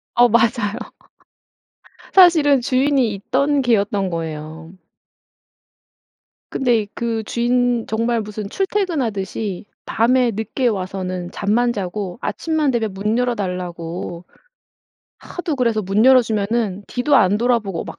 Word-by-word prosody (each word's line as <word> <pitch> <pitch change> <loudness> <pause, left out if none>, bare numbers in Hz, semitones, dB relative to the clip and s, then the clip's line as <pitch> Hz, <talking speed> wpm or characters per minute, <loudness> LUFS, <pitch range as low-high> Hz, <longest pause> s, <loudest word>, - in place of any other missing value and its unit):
어 245 0 +6
맞아요. 225 -2 +1 1.4
사실은 315 -8 +6
주인이 260 -2 +1
있던 280 +8 0
개였던 205 -5 +1
거예요. 160 0 -6 1.8
근데 235 -5 +1
그 230 -1 -2
주인 245 0 0
정말 230 +1 0
무슨 210 -1 -6
출퇴근하듯이 230 - -2 0.2
밤에 245 +2 +2
늦게 225 +5 -1
와서는 185 -3 -4
잠만 235 +4 +1
자고 195 -1 -5
아침만 315 -3 -1
되면 225 -4 -1
문 210 +4 -1
열어 245 -1 +1
달라고 175 -3 -5 0.9
하도 350 -4 -5
그래서 230 -4 +1
문 195 +4 +1
열어 260 -1 +7
주면은 215 -2 -1
뒤도 255 +4 0
안 195 +2 +3
돌아보고 230 -7 0
막 - - -9
225 Hz, 245 characters per minute, -20 LUFS, 195-245 Hz, 1.8 s, 열어